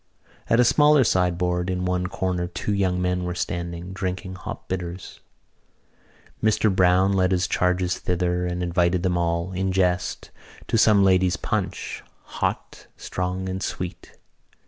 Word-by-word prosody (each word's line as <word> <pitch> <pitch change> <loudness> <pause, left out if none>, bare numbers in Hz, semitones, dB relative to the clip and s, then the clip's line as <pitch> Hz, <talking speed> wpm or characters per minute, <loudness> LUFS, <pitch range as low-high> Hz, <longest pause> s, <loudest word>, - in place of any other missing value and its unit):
At 115 - +4
a - - +7
smaller 150 +2 +5
sideboard 90 -2 +1
in 90 0 -1
one 90 0 0
corner 90 -2 -2
two 90 +4 -3
young 95 -2 +1
men 90 0 0
were 90 0 -3
standing, 85 +1 -4
drinking 95 -1 -4
hop 90 - -8
bitters. 90 0 -5 1.2
Mr 110 -2 +2
Browne 95 +1 +4
led 95 -1 +2
his 90 -1 +1
charges 90 0 0
thither 90 0 -1
and 90 0 -3
invited 90 0 +1
them 90 -2 +1
all, 85 +1 -1
in 95 +1 -1
jest, 90 -1 0 0.3
to - - -2
some 105 -2 +5
ladies' 95 -1 +3
punch, - - -3 0.2
hot, - - -4
strong 90 +1 -3
and 95 0 -4
sweet. 90 -2 -6
90 Hz, 145 wpm, -24 LUFS, 90-95 Hz, 1.2 s, a